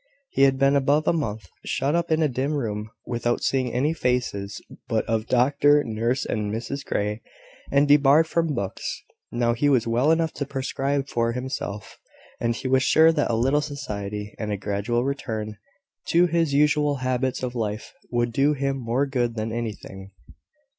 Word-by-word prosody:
He - - 0
had 135 -1 +3
been 135 +1 +3
above 140 +3 +2
a - - +4
month 110 - -3 0.2
shut 140 +2 -1
up 170 0 0
in 160 0 +2
a - - +4
dim 135 +3 -2
room, 110 -6 -3 0.2
without 120 0 -1
seeing 130 -2 0
any 140 +6 +1
faces 125 -8 -1 0.3
but - - 0
of 115 0 -1
doctor, 145 +4 +4
nurse, 115 +3 -1
and 105 -1 -2
Mrs 120 +5 -4
Grey, 105 +2 -2 0.5
and 140 +1 +4
debarred 145 +2 +6
from 165 -2 0
books; 100 -4 -4 0.3
now 120 0 +1
he 145 +5 +1
was 125 -5 +3
well 120 +5 +2
enough 160 0 +2
to 140 - -3
prescribe 135 +1 -2
for 115 -2 0
himself; 125 -5 -5 0.4
and 115 0 0
he 130 - -4
was 130 0 +3
sure 160 +4 +5
that 150 -3 0
a 115 - +1
little 135 +6 +2
society, 105 -8 -5
and 105 -1 -3
a 100 - -1
gradual 105 +5 -1
return 110 -6 -4 0.5
to 175 +1 +4
his 165 -3 +1
usual 150 0 +3
habits 130 0 -1
of 125 -1 -2
life, 110 -3 -4 0.2
would 120 -1 0
do 140 +4 +3
him 135 -1 -1
more 125 +2 0
good 120 -4 -1
than 110 0 -3
anything. 105 -4 -6
130 Hz, 175 wpm, -24 LUFS, 115-145 Hz, 0.5 s, debarred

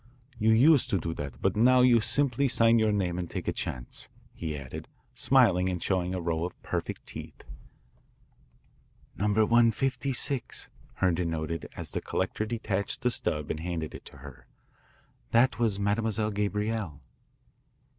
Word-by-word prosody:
"You 110 0 +2
used 130 +4 +5
to 100 - +2
do 80 0 -3
that, 70 -5 -7
but 95 - +2
now 125 +4 +5
you 125 -2 +6
simply 140 +3 +2
sign 115 -2 +4
your 110 -1 +2
name 90 -4 -1
and 85 -2 -4
take - - -5
a - - 0
chance," 60 -1 -6 0.2
he 80 -3 -5
added, 65 -2 -8 0.3
smiling 95 -9 +3
and 90 -1 -2
showing 90 +1 -1
a - - -2
row 85 -1 -1
of 90 - -6
perfect - - -4
teeth. - - -9 1.7
"Number 105 +2 +2
156," 125 +3 +1 0.3
Herndon 90 -2 +1
noted 80 -1 -4
as - - -1
the - - -3
collector 95 +3 -2
detached 105 -4 -2
the 125 - +2
stub 75 -9 -1
and 80 - -4
handed 80 -2 -4
it - - -10
to - - -13
her. 70 -3 -13 0.9
"That 120 0 +3
was 110 -4 +1
Mademoiselle 105 +1 0
Gabrielle." 105 -5 -2
105 Hz, 150 wpm, -28 LUFS, 85-115 Hz, 1.7 s, you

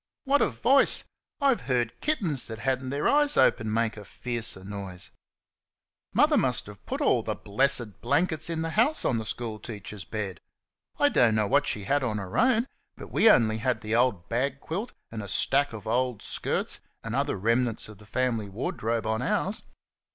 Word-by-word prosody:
What 280 +1 +2
a - - +3
voice! 270 +3 +3 0.4
I've 275 -4 +2
heard 120 -3 0
kittens 185 - -1
that 110 -1 -6
had 130 +3 0
n't 130 - -5
their 140 +2 0
eyes 295 0 +4
open 110 -1 +3
make 115 0 0
a 105 - -8
fiercer 115 -2 -4
noise. 95 -2 -7 1.0
Mother - - +4
must - - 0
have - - -12
put - - -3
all - - +3
the - - -3
blessed 120 0 +1
blankets 155 +5 0
in 165 -1 -2
the 165 - -3
house 240 - +2
on 115 - +1
the 110 - -5
school 115 -3 -4
teacher's 105 -2 -8
bed. 100 -1 -5 0.6
I - - +4
don't 115 -3 +4
know 110 -1 +2
what 145 +8 +2
she 105 - -2
had 145 +8 +1
on 110 -4 -1
her 95 -2 -6
own, 240 -1 +3 0.3
but - - -10
we 225 - +5
only 110 -1 +4
had 120 -1 0
the 110 0 -3
old 115 -7 +2
bag 135 +4 -1
quilt 195 +12 -4 0.2
and 115 -1 -5
a 100 - -7
stack 140 +8 +2
of 110 -2 -9
old 125 0 0
skirts, - - 0 0.2
and 115 - -5
other 140 -2 0
remnants 115 +3 +1
of 105 -2 -13
the 105 - -16
family 115 -3 -1
wardrobe, 115 - -2
on 110 +1 -1
ours. 190 +10 -1
120 Hz, 190 wpm, -27 LUFS, 110-145 Hz, 1.0 s, we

